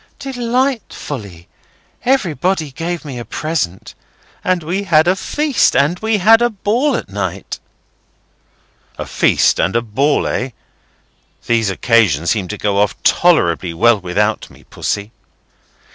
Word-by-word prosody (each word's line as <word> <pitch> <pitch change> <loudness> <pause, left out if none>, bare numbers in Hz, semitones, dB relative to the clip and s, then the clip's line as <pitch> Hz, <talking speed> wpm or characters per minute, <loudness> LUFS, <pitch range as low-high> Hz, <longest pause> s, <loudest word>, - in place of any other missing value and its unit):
"Delightfully! 235 - -3 0.6
Everybody 180 - 0
gave 170 +4 -4
me 130 -4 -6
a - - -5
present. 145 - -3 0.5
And 185 -2 0
we 180 +5 -2
had 160 -3 +4
a 185 - +4
feast. 290 +5 +1
And 160 +6 +2
we 220 -1 +1
had 225 +4 +5
a 240 - +3
ball 235 +6 0
at - - -4
night." 100 -1 -5 1.4
"A - - -5
feast - - +2
and 95 - +1
a 115 - +3
ball, 135 +7 +1
eh? 125 - -2 1.0
These 115 -3 +1
occasions 95 - +2
seem 100 -5 -1
to 105 - -5
go 100 -1 0
off 105 0 +1
tolerably 90 - +2
well 115 +5 +4
without 100 +4 -1
me, - - -18
Pussy." 100 +1 -4
145 Hz, 130 wpm, -17 LUFS, -, 1.4 s, had